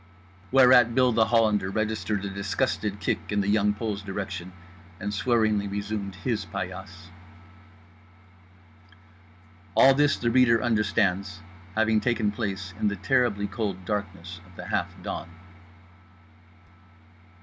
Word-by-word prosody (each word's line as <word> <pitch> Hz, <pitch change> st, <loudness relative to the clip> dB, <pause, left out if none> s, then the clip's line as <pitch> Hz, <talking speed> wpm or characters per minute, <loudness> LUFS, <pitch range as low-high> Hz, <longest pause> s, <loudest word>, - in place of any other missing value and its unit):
_" -, -, -27 dB, 0.5 s
Whereat 125 Hz, -3 st, +6 dB
Bill 130 Hz, -1 st, +4 dB
The 110 Hz, -1 st, +3 dB
Hollander 110 Hz, -4 st, +2 dB
registered 105 Hz, -1 st, -2 dB
a -, -, -3 dB
disgusted 100 Hz, +1 st, -2 dB
kick 95 Hz, -, -2 dB
in 105 Hz, 0 st, +1 dB
The 100 Hz, -, -2 dB
Young 105 Hz, 0 st, +3 dB
Pole's 105 Hz, -2 st, -3 dB
direction 95 Hz, -2 st, -5 dB, 0.5 s
and 100 Hz, +1 st, -4 dB
swearingly 110 Hz, -2 st, +1 dB
resumed 100 Hz, -1 st, -4 dB
his 110 Hz, +2 st, -2 dB
paillasse. 95 Hz, 0 st, -7 dB, 2.6 s
All 135 Hz, -, +7 dB
this, 145 Hz, +1 st, +2 dB
the 120 Hz, -1 st, 0 dB
reader 120 Hz, -2 st, +5 dB
understands, 100 Hz, -5 st, 0 dB, 0.3 s
having 110 Hz, 0 st, +2 dB
taken 120 Hz, -4 st, +1 dB
place 95 Hz, -3 st, -4 dB
in -, -, +1 dB
the 100 Hz, -, 0 dB
terribly 105 Hz, +1 st, +1 dB
cold 100 Hz, -2 st, -4 dB
darkness 95 Hz, -4 st, -5 dB
of 95 Hz, -, -19 dB
the -, -, -8 dB
half -, -, 0 dB, 0.2 s
dawn. 80 Hz, -, -5 dB
105 Hz, 125 wpm, -26 LUFS, 95-115 Hz, 2.6 s, All